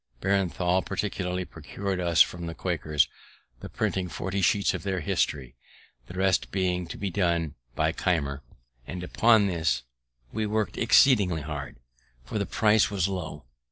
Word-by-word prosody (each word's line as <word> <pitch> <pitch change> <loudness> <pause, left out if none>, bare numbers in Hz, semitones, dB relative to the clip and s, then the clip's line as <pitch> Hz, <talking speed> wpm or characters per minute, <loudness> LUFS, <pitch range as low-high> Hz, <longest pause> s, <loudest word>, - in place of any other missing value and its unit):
Breintnal 95 -1 +1
particularly 90 -3 -2
procur'd 95 +5 -5
us 85 -2 +5
from 85 -1 -7
the 85 - -5
Quakers 80 -6 +1 0.5
the - - -8
printing 95 -2 -1
forty 95 +3 -3
sheets 100 +2 +3
of - - -4
their 95 -2 -2
history, 65 -4 -1 0.5
the 85 - -10
rest 95 0 +2
being 90 -2 -1
to - - -7
be 100 -1 -3
done 85 -4 0 0.2
by - - +2
Keimer; 70 -6 -1 0.5
and 90 0 -5
upon 110 +3 +4
this 80 -10 0 0.5
we 110 0 -1
work'd 110 0 -1
exceedingly 105 - +4
hard, 70 -1 -6 0.5
for 85 - -3
the 100 - -1
price 110 0 +3
was 95 -3 0
low. 80 -7 -5
90 Hz, 150 wpm, -27 LUFS, 80-100 Hz, 0.5 s, us